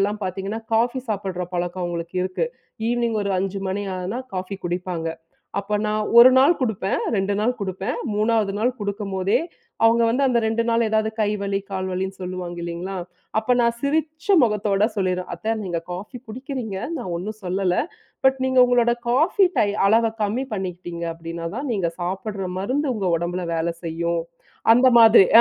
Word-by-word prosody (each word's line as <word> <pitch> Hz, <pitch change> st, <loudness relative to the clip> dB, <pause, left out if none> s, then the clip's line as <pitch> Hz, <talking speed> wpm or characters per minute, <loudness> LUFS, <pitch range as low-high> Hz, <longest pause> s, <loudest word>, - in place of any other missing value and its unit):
எல்லாம் 205 Hz, +2 st, 0 dB
பார்த்தீங்கன்னா, 195 Hz, +4 st, -3 dB
காஃபி 240 Hz, +3 st, +2 dB
சாப்பிடுற 190 Hz, -3 st, -2 dB
பழக்கம் 175 Hz, +1 st, -2 dB
அவங்களுக்கு 170 Hz, 0 st, -4 dB
இருக்கு. 185 Hz, -, -1 dB, 0.4 s
ஈவ்னிங் 235 Hz, -2 st, 0 dB
ஒரு 200 Hz, -, 0 dB
5:00 195 Hz, +1 st, -2 dB
மணி 195 Hz, +2 st, -2 dB, 0.2 s
ஆனா 185 Hz, +6 st, -3 dB, 0.2 s
காஃபி 185 Hz, +2 st, -4 dB
குடிப்பாங்க. 175 Hz, -1 st, -3 dB, 0.5 s
அப்ப 200 Hz, +1 st, -2 dB
நான் 215 Hz, 0 st, 0 dB
1 245 Hz, +2 st, +10 dB
நாள் 285 Hz, +6 st, +6 dB
குடுப்பேன். 215 Hz, -6 st, 0 dB, 0.2 s
2 195 Hz, +1 st, 0 dB
நாள் 230 Hz, +4 st, +2 dB
குடுப்பேன். 190 Hz, +3 st, -3 dB, 0.2 s
3ஆவது 215 Hz, -1 st, +2 dB
நாள் 240 Hz, +4 st, +2 dB
குடுக்கும்போதே, 200 Hz, -1 st, -1 dB, 0.5 s
அவங்க 230 Hz, +1 st, +5 dB
வந்து 265 Hz, +4 st, +2 dB
அந்த 250 Hz, -2 st, +3 dB
2 225 Hz, +1 st, +1 dB
நாளு 230 Hz, 0 st, +3 dB
ஏதாவது 220 Hz, 0 st, +1 dB
கை 210 Hz, -, +2 dB
வலி 200 Hz, 0 st, -1 dB
கால் 190 Hz, -1 st, -3 dB
வலின்னு 190 Hz, +1 st, -3 dB
சொல்லுவாங்க. 180 Hz, -1 st, -5 dB
இல்லைங்களா. 170 Hz, +3 st, -4 dB, 0.4 s
அப்ப 250 Hz, +3 st, +2 dB
நான் 235 Hz, 0 st, +2 dB
சிரிச்ச 310 Hz, +2 st, -1 dB, 0.2 s
முகத்தோட 210 Hz, -2 st, +2 dB
சொல்லிருவேன், 185 Hz, -2 st, -1 dB
"அத்த 220 Hz, +1 st, -2 dB
நீங்க 175 Hz, -3 st, -2 dB
காஃபி 205 Hz, +8 st, -7 dB
குடிக்கிறீங்க. 245 Hz, -3 st, -5 dB, 0.2 s
நான் 235 Hz, -, -4 dB
ஒண்ணும் 210 Hz, +5 st, -5 dB
சொல்லல. 185 Hz, 0 st, 0 dB, 0.5 s
பட் 265 Hz, 0 st, +4 dB
நீங்க 260 Hz, 0 st, +2 dB
உங்களோட 240 Hz, -1 st, +3 dB, 0.2 s
காஃபி 320 Hz, +9 st, +4 dB
டை 205 Hz, -, +4 dB, 0.2 s
அளவ 225 Hz, +2 st, +4 dB
கம்மி 225 Hz, +6 st, -1 dB
பண்ணிக்கிட்டீங்க 175 Hz, -3 st, -5 dB
அப்படின்னாதான் 165 Hz, -, -5 dB
நீங்க 180 Hz, -5 st, 0 dB
சாப்பிடுற 195 Hz, +2 st, -3 dB
மருந்து 260 Hz, +7 st, 0 dB
உங்க 195 Hz, -3 st, -1 dB
உடம்பில 175 Hz, +2 st, -3 dB
வேலை 165 Hz, +1 st, -1 dB
செய்யும்," 170 Hz, +1 st, -1 dB, 0.5 s
அந்த 255 Hz, +2 st, +6 dB
மாதிரி. 225 Hz, -4 st, +8 dB
200 Hz, 160 wpm, -23 LUFS, 185-230 Hz, 0.5 s, 1